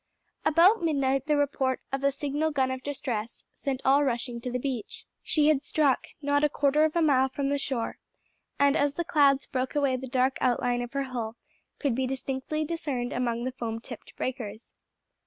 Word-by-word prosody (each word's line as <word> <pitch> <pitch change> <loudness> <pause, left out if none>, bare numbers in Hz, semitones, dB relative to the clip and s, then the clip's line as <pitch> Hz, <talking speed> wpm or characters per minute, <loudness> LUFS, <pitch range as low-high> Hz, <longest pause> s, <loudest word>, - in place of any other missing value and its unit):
About 345 +7 +5
midnight 275 -4 +1
the 300 -1 +3
report 270 -2 0
of 270 0 -2
a 280 - +4
signal 290 +3 -1
gun 265 -3 +1
of 260 0 -4
distress 245 -6 -4
sent 270 -2 -3
all 275 +2 +5
rushing 240 -2 -2
to 250 - -4
the 250 - 0
beach. 250 -3 -4 0.2
She 300 -1 +2
had 295 -3 +3
struck, 285 -2 +1 0.2
not 285 +1 +2
a 300 - +4
quarter 290 +1 +2
of 315 - -1
a 340 - +3
mile 265 -3 +4
from 275 +1 -2
the 285 0 0
shore; 255 -4 -3 0.6
and 280 0 +4
as 285 -1 +1
the 345 - -1
clouds 280 -3 +4
broke 260 0 -3
away 280 -3 +2
the 260 +1 -6
dark 260 +1 +1
outline 245 -1 +1
of 245 +2 -6
her 275 0 0
hull 240 -4 -4 0.4
could 280 -5 0
be 260 +2 0
distinctly 270 +3 -2
discerned 290 -7 -3
among 240 -1 -1
the 255 - -2
foam 230 -3 -4
tipped - - -10
breakers. 230 -4 -5
270 Hz, 195 wpm, -28 LUFS, 250-290 Hz, 0.6 s, About